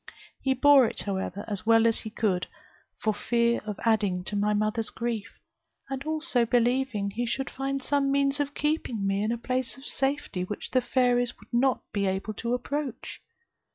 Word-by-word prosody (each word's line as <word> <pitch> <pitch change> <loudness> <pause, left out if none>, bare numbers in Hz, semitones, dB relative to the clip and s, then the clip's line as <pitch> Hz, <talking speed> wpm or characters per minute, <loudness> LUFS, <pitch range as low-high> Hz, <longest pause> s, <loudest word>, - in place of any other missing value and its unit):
He 265 -1 +1
bore 275 -1 +7
it, - - -4
however, 195 0 -3
as 205 0 -4
well 225 0 +6
as 225 -1 +3
he 220 - -6
could, 205 -5 0 0.5
for 215 - 0
fear 235 +2 +1
of 210 -2 -4
adding 205 -5 +2
to 205 - -5
my 205 +1 +2
mother's 215 +1 0
grief; 230 -2 -4 0.5
and 270 0 -3
also 310 -5 +1
believing 240 -3 +1
he 240 +4 -2
should 270 +3 -2
find 270 0 -3
some 280 0 +1
means 280 +1 +2
of 285 0 -2
keeping 295 -9 -1
me 195 0 +1
in 215 - 0
a 235 - -1
place 255 +2 -2
of 270 - -13
safety, 270 -9 -1
which 205 +3 -6
the 255 - +3
fairies 245 -1 +1
would - - -20
not 255 +2 +2
be 200 -1 0
able 190 +3 -2
to 235 +3 -1
approach. 270 0 -4
235 Hz, 185 wpm, -27 LUFS, 210-270 Hz, 0.5 s, bore